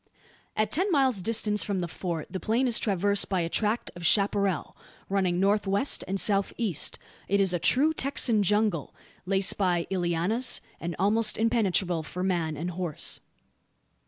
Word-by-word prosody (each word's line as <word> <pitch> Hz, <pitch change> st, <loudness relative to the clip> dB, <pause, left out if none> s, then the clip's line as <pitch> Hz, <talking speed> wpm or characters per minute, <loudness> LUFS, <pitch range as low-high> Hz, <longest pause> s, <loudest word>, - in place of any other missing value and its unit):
At 215 Hz, 0 st, 0 dB
ten 375 Hz, +5 st, 0 dB
miles' 265 Hz, -, +2 dB
distance 210 Hz, 0 st, +1 dB
from 200 Hz, -2 st, -2 dB
the 175 Hz, -, -2 dB
Fort 170 Hz, -2 st, -5 dB
the 185 Hz, -, -6 dB
plain 230 Hz, +6 st, 0 dB
is 235 Hz, -2 st, +4 dB
traversed 200 Hz, 0 st, 0 dB
by 190 Hz, -3 st, 0 dB
a 165 Hz, -, -2 dB
tract 215 Hz, +5 st, -1 dB
of 175 Hz, -, -9 dB
chapparal, 200 Hz, -1 st, +1 dB, 0.3 s
running 185 Hz, -3 st, 0 dB
north 200 Hz, +2 st, +1 dB
west 200 Hz, +8 st, +1 dB
and 195 Hz, +1 st, -2 dB
south 200 Hz, -2 st, +2 dB
east. 200 Hz, -, 0 dB, 0.3 s
It 200 Hz, +1 st, +1 dB
is 190 Hz, -2 st, +2 dB
a 175 Hz, -, 0 dB
true 290 Hz, -, +3 dB
Texan 255 Hz, -7 st, +2 dB
jungle, 205 Hz, -5 st, 0 dB, 0.3 s
laced 195 Hz, +1 st, +3 dB
by 175 Hz, -3 st, +1 dB
llianas, 180 Hz, +7 st, 0 dB, 0.2 s
and 170 Hz, 0 st, -5 dB
almost 215 Hz, +4 st, +2 dB
impenetrable 200 Hz, -7 st, +1 dB
for 180 Hz, +4 st, -6 dB
man 170 Hz, -5 st, -1 dB
and 175 Hz, +4 st, -4 dB
horse. 175 Hz, -3 st, -4 dB
195 Hz, 160 wpm, -27 LUFS, 175-220 Hz, 0.3 s, is